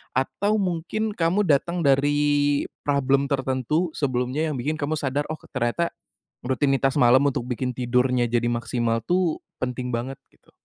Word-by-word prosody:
atau 200 +11 0
mungkin 195 +3 -1
kamu 180 +2 +1
datang 170 +2 +1
dari 145 +1 +2 0.2
problem 140 0 +2
tertentu 135 +5 0
sebelumnya? 130 +2 -1
Yang 145 - -3
bikin 155 +3 -1
kamu 150 +2 -1
sadar, 145 0 -2
"Oh, 155 - -3 0.2
ternyata 120 +9 -1 0.5
rutinitas 135 0 +1
malam 130 +3 +5
untuk 130 -3 -1
bikin 125 0 -3
tidurnya, 125 0 +1
jadi 120 0 +1
maksimal 120 0 -1
tuh, 175 +3 0 0.2
penting 125 0 -3
banget." 125 +3 -3 0.2
Gitu? - - -28
140 Hz, 140 wpm, -24 LUFS, 125-155 Hz, 0.5 s, malam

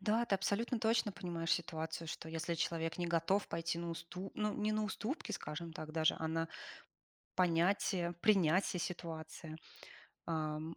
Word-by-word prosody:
Да, 215 +4 +3
ты 200 - +3
абсолютно 215 +5 +1
точно 220 -2 +3
понимаешь 170 -3 -1
ситуацию, 160 -1 -1
что 160 - -5
если 165 +1 -1
человек 165 0 -1
не 175 - 0
готов 170 +4 +2
пойти 165 0 -1
на 170 0 -2
усту 170 +3 -5
ну, 210 -1 +1
не 215 +1 0
на 215 0 +1
уступки, 220 +3 -3
скажем 165 -3 -4
так 155 -2 -6
даже, 160 0 +3
а 160 - -1
на 165 0 0 0.9
понятие, 175 0 +3
принятие 185 -2 +4
ситуации, 160 -2 -5 0.7
эм, 155 0 -2
170 Hz, 150 wpm, -37 LUFS, 165-195 Hz, 0.9 s, принятие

